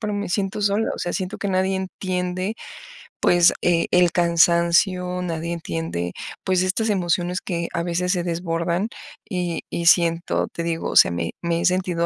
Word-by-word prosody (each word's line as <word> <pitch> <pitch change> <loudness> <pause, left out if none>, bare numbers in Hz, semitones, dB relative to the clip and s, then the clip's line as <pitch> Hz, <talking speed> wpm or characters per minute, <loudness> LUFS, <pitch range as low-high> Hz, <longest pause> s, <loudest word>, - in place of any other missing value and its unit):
pero 210 -2 -3
me 205 0 -3
siento 195 +2 -1
sola, 205 +2 +1
o - - -9
sea, 175 - -3
siento 185 0 -4
que - - -3
nadie 190 0 +1
entiende 185 +1 -3 0.7
pues, 175 -1 +5
eh, 170 -1 +2
el 180 -1 +4
cansancio, 175 +2 +2
nadie 170 -1 -3
entiende, 85 - -4 0.3
pues, 185 -1 +1
estas 215 +4 0
emociones 180 -2 0
que 170 -3 -3
a 170 - -1
veces 180 +1 -1
se 175 -2 -1
desbordan 170 +3 -1 0.4
y 180 -4 -2
y 170 - -3
siento, 170 -1 +3
te 170 - -4
digo, 165 -1 -2
o - - -6
sea, - - +7
me 85 -1 -3
me 170 -1 -1
he - - -1
sentido 180 -2 +1
175 Hz, 175 wpm, -22 LUFS, 170-185 Hz, 0.7 s, sea